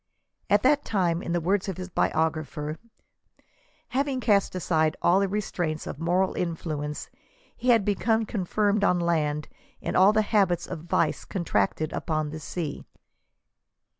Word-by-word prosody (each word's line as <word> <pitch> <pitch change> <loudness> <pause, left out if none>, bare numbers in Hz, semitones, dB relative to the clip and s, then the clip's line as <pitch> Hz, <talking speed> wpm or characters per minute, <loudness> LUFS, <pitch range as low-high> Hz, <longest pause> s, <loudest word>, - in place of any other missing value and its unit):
At 205 0 +4
that 285 +2 +4
time, 175 -5 0
in - - -4
the 175 - +1
words 190 +4 0
of 190 - -4
his 185 0 -7
biogra 160 -1 +1
pher, 150 +1 -5 0.5
" - - -37 0.3
having 275 0 0
cast 205 -6 +2
aside 160 -3 +1
all 180 +3 +5
the 200 - +2
restraints 180 -6 -2
of - - -6
moral 180 +3 +1
influence, 155 -4 -3 0.5
he 250 - -2
had 225 -5 +5
become 220 +2 +1
confirmed 205 +1 0
on 180 -3 +3
land 150 -3 0 0.3
in - - -3
all 190 +2 +7
the 215 0 +2
habits 200 -5 +2
of 160 - -7
vice 165 -2 +1
con 180 -3 -4
tracted 150 +7 0
upon 155 -2 -2
the 155 - -6
sea." 155 -1 -5
175 Hz, 160 wpm, -26 LUFS, 155-205 Hz, 0.5 s, all